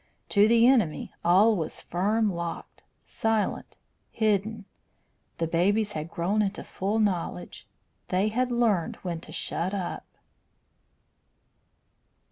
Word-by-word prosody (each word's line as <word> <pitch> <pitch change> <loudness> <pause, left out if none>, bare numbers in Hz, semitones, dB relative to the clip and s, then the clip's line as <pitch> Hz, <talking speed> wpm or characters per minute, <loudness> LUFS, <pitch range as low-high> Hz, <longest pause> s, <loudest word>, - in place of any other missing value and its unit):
To 205 0 +5
the 230 +1 +5
enemy 230 - +2
all 200 +6 +5
was 165 -5 -4
firm 205 +4 0
locked, 170 -1 -6 0.2
silent, 225 -2 -1 0.3
hidden. 215 0 0 0.7
The 165 - 0
babies 200 +6 +1
had 155 -2 -5
grown 180 +6 0
into 205 0 -2
full 200 +4 -2
knowledge; 185 -4 -2 0.4
they 190 +3 +1
had 250 +3 0
learned 225 -8 +1
when 170 -3 -4
to 160 - -13
shut 180 +3 -2
up. 185 -3 -4
200 Hz, 110 wpm, -27 LUFS, 175-220 Hz, 0.7 s, To